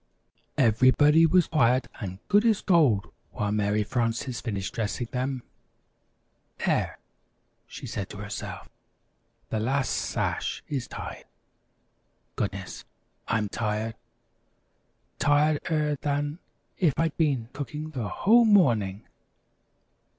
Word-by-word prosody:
Everybody 130 +7 +5
was 175 +1 +4
quiet 130 -5 +2
and 95 -5 -5
good 205 +1 +4
as 225 -4 +3
gold 145 - +3 0.2
while 105 -1 -1
Mary 105 0 +1
Frances 120 +2 -2
finished 100 -5 -3
dressing 115 +2 -2
them. 130 0 -2 1.2
"There," - - 0 0.7
she - - -9
said - - -4
to - - -9
herself, - - -6 0.8
"the 110 - 0
last 130 +3 0
sash - - -2
is 130 -6 -3
tied. - - -7 1.1
Goodness, 95 -2 -4 0.4
I'm 110 -2 +1
tired 110 +1 -2 1.3
tired 145 +1 +3
er 150 -2 +1
than 145 +2 -1 0.4
if 165 -8 +3
I'd 165 -2 +1
been 135 -8 0
cooking 150 +2 -5
the 125 -8 -3
whole 235 +4 +5
morning! 115 - +3
130 Hz, 105 wpm, -27 LUFS, 110-150 Hz, 1.3 s, Everybody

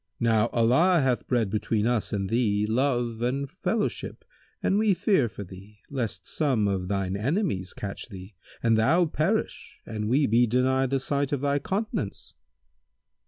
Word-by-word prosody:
Now 115 -1 +3
Allah 130 +11 +3
hath 130 -3 0
bred 115 -6 +1
between 105 0 0
us 120 -2 0
and 100 -2 -1
thee 105 -2 +1
love 120 0 0
and 135 +3 -1
fellowship 205 +7 -3 0.4
and 195 - +2
we 215 -3 +3
fear 170 - +2
for 105 - -8
thee, 100 +3 -13
lest 125 -6 -3
some 130 -9 +1
of 95 -2 -1
thine 95 -1 -1
enemies 115 - -1
catch 100 +2 -6
thee 95 0 -10 0.3
and 115 -1 +3
thou 165 +10 +4
perish 170 +7 -2
and 105 -1 -4
we 140 +4 +3
be 120 +2 +3
denied 130 +2 +2
the 135 0 +1
sight 140 +1 -1
of 140 -3 -1
thy 140 0 +1
countenance." 190 - -3
120 Hz, 160 wpm, -26 LUFS, 105-140 Hz, 0.4 s, thou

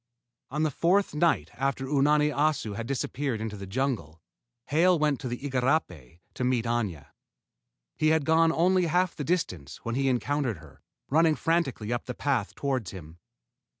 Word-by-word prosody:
On 150 +3 -1
the 155 - +1
fourth 185 +8 +2
night 150 - +1
after 135 +2 -2
Unani 150 +2 +3
Assu 145 -8 0
had 115 +2 -5
disappeared 135 -2 -2
into 110 -1 -4
the 100 -1 -8
jungle, 100 - -2 0.5
Hale 170 +5 +4
went 150 -3 +1
to 130 - -5
the 120 0 -3
igarapé 125 - -1
to - - -4
meet 125 -2 +1
Aña. 110 -10 -2 0.9
He 155 - +2
had 160 -2 +3
gone 165 +1 +4
only 180 +2 +3
half 180 +2 +1
the 145 - -4
distance 90 - -2
when 115 - -2
he 135 +2 +1
encountered 130 -2 0
her, 75 -2 -16 0.3
running 160 +1 +4
frantically 135 -11 0
up 120 - -3
the 125 - -5
path 130 -8 -1
toward 130 -8 -2
him. 85 -3 -11
135 Hz, 165 wpm, -27 LUFS, 110-155 Hz, 0.9 s, Hale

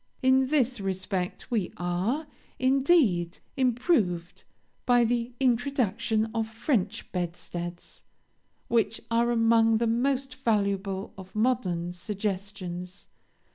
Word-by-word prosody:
In 260 0 +4
this 260 -4 +1
respect 190 +2 -3
we 210 -7 0
are, 185 - -1 0.3
indeed, 260 - +3 0.2
improved, 235 - +1 0.4
by 245 -1 +5
the 235 +1 0
introduction 235 -4 +1
of 225 -1 -1
French 225 -2 -1
bedsteads, 175 -1 -5 0.7
which 225 -1 +1
are 235 +1 +3
among 225 -1 +4
the 235 - +1
most 265 +4 0
valuable 200 -3 0
of 190 +1 -12
modern 190 -7 0
suggestions. 190 -2 -5
225 Hz, 95 wpm, -27 LUFS, 185-245 Hz, 0.7 s, by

